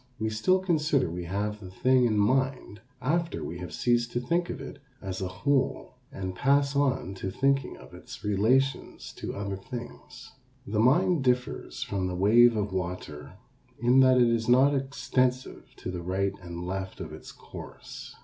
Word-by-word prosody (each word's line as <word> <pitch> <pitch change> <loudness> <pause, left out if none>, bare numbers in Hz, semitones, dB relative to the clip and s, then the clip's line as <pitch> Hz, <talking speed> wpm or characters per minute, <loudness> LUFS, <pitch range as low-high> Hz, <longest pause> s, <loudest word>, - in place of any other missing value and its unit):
We 110 -1 -1
still 110 +13 +3
consider 155 - +1
we 90 0 -5
have 105 +4 -2
the 95 -3 -9
thing 130 +6 +3
in 110 -3 +1
mind 130 0 0 0.2
after 170 +5 0
we 85 +2 -6
have 90 -3 -7
ceased 120 +3 +1
to 120 - 0
think 170 +8 0
of - - -5
it - - -9 0.2
as 95 -1 -5
a 95 - -1
whole 130 +9 -1 0.2
and 95 -1 -5
pass 140 +6 +2
on 135 -8 +1
to 95 0 -5
thinking 135 +5 0
of - - -15
its - - -11
relations 120 +7 0
to - - -5
other 100 -1 -4
things. 120 +5 -9 0.3
The 105 +1 -2
mind 155 +6 +3
differs 125 0 -1
from 95 -2 -2
the 90 - -3
wave 115 +5 +5
of 100 -2 -2
water 85 -6 -5 0.5
in 125 +2 +4
that 130 -1 +6
it 120 -1 +5
is 115 0 0
not 130 +4 +5
extensive 130 -2 -1
to 90 - -6
the 90 -1 -5
right 95 +3 -1
and 85 -1 -7
left 95 +1 -4
of 80 -1 -7
its 80 - -10
course. - - -10
120 Hz, 175 wpm, -28 LUFS, 95-130 Hz, 0.5 s, that